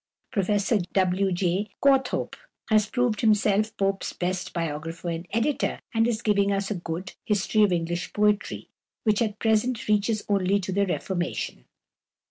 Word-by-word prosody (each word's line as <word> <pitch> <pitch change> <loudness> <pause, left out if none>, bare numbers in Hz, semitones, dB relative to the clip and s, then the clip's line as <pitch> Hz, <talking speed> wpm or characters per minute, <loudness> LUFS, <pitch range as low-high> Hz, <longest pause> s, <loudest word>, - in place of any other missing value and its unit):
Professor 205 0 +1
W. 190 0 +2
J. 185 +3 0
Courthope 270 -2 +2 0.4
has 215 -1 +4
proved 245 -3 0
himself 215 -1 +2
Pope's 195 0 -1
best 185 +1 -2
biographer 165 +1 -4
and 170 +1 -4
editor, 245 +6 0
and 225 0 +3
is 235 -1 -1
giving 200 -2 +2
us 195 +1 -1
a - - +2
good 175 0 -5
"History 210 +1 +1
of 205 -2 +5
English 175 0 -2
Poetry," 210 0 0 0.4
which 215 -1 +2
at 215 -2 0
present 225 +2 +1
reaches 210 +1 +1
only 200 0 +2
to 190 0 -4
the 200 +1 +1
Reformation. 175 - -3
200 Hz, 145 wpm, -26 LUFS, 185-215 Hz, 0.4 s, of